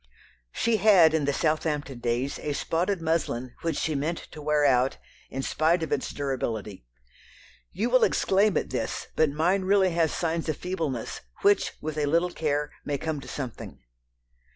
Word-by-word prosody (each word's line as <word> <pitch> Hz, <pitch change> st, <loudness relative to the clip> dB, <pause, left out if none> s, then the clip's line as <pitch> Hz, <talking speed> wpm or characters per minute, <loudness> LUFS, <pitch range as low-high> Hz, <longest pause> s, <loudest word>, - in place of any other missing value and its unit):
She 230 Hz, -, +1 dB
had, 185 Hz, -6 st, +6 dB
in 155 Hz, -3 st, +1 dB
the 145 Hz, -, +2 dB
Southampton 150 Hz, -3 st, -1 dB
days, 120 Hz, +3 st, -1 dB
a 150 Hz, -, -3 dB
spotted 175 Hz, +5 st, -1 dB
muslin 130 Hz, -7 st, -1 dB
which 165 Hz, -3 st, -1 dB
she 160 Hz, -, -1 dB
meant 155 Hz, +4 st, -1 dB
to 155 Hz, -, -9 dB
wear 150 Hz, 0 st, +2 dB
out, 130 Hz, -1 st, +3 dB, 0.3 s
in 135 Hz, +1 st, -4 dB
spite 165 Hz, +4 st, +1 dB
of 160 Hz, -, -4 dB
its -, -, -1 dB
durability. 110 Hz, -, -4 dB, 0.8 s
"You 220 Hz, -, -1 dB
will 255 Hz, -, +5 dB
exclaim 200 Hz, +1 st, +3 dB
at -, -, -2 dB
this, -, -, -3 dB
but 155 Hz, -1 st, +3 dB
mine 170 Hz, +7 st, +1 dB
really 190 Hz, 0 st, +3 dB
has 165 Hz, -2 st, +1 dB
signs 165 Hz, -1 st, -2 dB
of 155 Hz, -, -1 dB
feebleness, 160 Hz, -10 st, -3 dB, 0.2 s
which, 205 Hz, 0 st, +3 dB
with 155 Hz, 0 st, -3 dB
a 145 Hz, -, +1 dB
little 170 Hz, +4 st, +2 dB
care, 150 Hz, -3 st, -1 dB
may 145 Hz, -1 st, -2 dB
come 155 Hz, 0 st, -3 dB
to -, -, -11 dB
something." 130 Hz, -5 st, -6 dB
155 Hz, 170 wpm, -27 LUFS, 140-170 Hz, 0.8 s, had